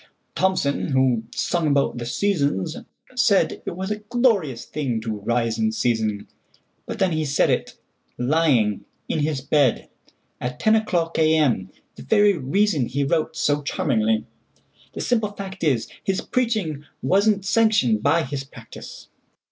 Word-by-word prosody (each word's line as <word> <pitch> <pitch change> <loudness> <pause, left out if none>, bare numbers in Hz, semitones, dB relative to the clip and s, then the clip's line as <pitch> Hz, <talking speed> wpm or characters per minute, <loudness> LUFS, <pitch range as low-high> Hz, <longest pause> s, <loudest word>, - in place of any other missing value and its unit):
Thomson, 185 -7 0
who 130 -4 +2
sung 170 -3 0
about 140 -4 +1
the 120 - -5
"Seasons," 145 - 0 0.4
saidIt - - +2
was 190 +3 -4
a 210 - -2
glorious 210 - 0
thing 130 -7 -2
to 110 -2 -4
rise 115 +2 -1
in 220 0 +1
season; 110 - -1 0.6
But - - -5
then 190 -2 +1
he 155 -1 0
said 145 -1 +2
it—lying—in 125 -2 -1
his 150 -2 -1
bed, 140 -3 +1 0.5
At 125 0 -5
ten 220 0 +4
o'clock 175 -7 0
A.M.,—the 150 - 0
very 205 -2 +4
reasonHe 140 - 0
wrote 160 -1 0
so 145 0 +1
charmingly. 110 -6 0 0.7
The - - -5
simple 220 -4 0
fact 195 -2 -7
is, 130 -8 +1 0.2
His 195 -1 0
preaching 215 - -1 0.2
was 200 +3 +3
n't 200 -2 0
sanctioned 210 - +3
by 160 +6 +3
his 135 0 -4
practice. 125 -4 -12
150 Hz, 130 wpm, -23 LUFS, 125-195 Hz, 0.7 s, ten